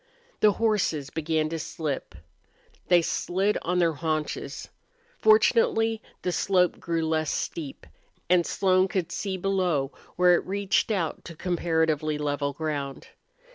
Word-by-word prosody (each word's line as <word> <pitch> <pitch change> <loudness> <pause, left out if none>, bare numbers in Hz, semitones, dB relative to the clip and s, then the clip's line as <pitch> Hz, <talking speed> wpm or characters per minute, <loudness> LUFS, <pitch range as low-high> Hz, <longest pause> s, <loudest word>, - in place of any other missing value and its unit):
The 210 -1 +5
horses 195 -11 0
began 160 -1 0
to 165 0 -3
slip. 150 - -4 0.7
They 175 -2 +5
slid 195 +5 0
on 180 +1 -1
their 170 -2 +3
haunches. 155 0 -3 0.5
Fortunately 430 - +4 0.2
the 180 - 0
slope 180 0 +2
grew 165 -1 -1
less 155 -1 0
steep, 150 -5 -4 0.4
and 180 -1 +4
Slone 185 +1 +2
could 180 -3 -2
see 190 0 -3
below 180 -7 0 0.2
where 180 0 +5
it 175 - +1
reached 200 +2 +1
out 185 -7 -1
to 170 - -9
comparatively 160 -3 0
level 145 -1 -1
ground. 145 -2 -4
170 Hz, 130 wpm, -26 LUFS, 155-190 Hz, 0.7 s, The